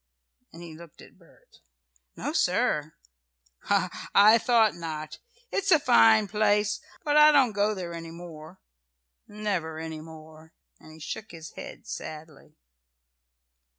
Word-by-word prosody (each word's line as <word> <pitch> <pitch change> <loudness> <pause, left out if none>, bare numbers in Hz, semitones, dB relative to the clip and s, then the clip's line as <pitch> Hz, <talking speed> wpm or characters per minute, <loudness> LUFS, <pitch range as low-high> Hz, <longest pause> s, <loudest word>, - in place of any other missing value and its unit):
and 170 +1 -12
he 165 -2 -10
looked 165 -1 -15
at - - -17
Bert. - - -24 0.6
"No, - - -4
sir." - - 0 0.7
"Ha! - - -1
I 215 +3 +7
thought 225 -2 +3
not. 155 -3 -7 0.3
It's 395 - -1
a 330 - +7
fine 225 -6 +5
place. 210 0 +1 0.2
But 295 -1 +1
I 300 0 +8
don't 270 -5 +4
go 210 +1 0
there 175 -3 -6
any 165 0 -8
more 165 0 -11 0.7
never 195 -7 -4
any 160 -1 -6
more," 160 0 -14 0.3
and 155 - -15
he 160 - -14
shook 215 +7 -7
his 160 -2 -10
head - - -10
sadly. 155 -2 -9
175 Hz, 135 wpm, -26 LUFS, 160-215 Hz, 0.7 s, I